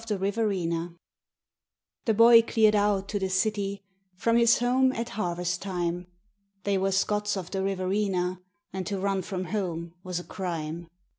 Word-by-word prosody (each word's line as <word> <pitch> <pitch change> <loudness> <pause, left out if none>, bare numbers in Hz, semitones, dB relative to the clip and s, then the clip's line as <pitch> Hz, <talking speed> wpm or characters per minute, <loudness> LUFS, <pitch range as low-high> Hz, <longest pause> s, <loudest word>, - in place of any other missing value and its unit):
9 210 - 0
Autoplay 185 -5 -1 1.1
The 225 - +3
boy 230 +1 +8
cleared 220 -2 +3
out 205 -1 +2
to 205 - -1
the 190 -1 -1
city 200 +1 -1 0.3
from 230 +5 +1
his 235 0 +5
home 255 +2 +3
at 230 0 -3
harvest 180 -3 -2
time 180 -2 -3 0.6
They 200 -1 +1
were 195 +1 +1
Scots 210 +2 0
of 185 -2 -6
the 195 - -1
Riverina, 185 -1 -1 0.3
and 190 -1 -4
to 200 -2 -2
run 195 0 0
from 185 0 -4
home 170 -5 -3
was 180 -1 -3
a - - -8
crime. 170 -3 -5
195 Hz, 155 wpm, -27 LUFS, 180-210 Hz, 1.1 s, boy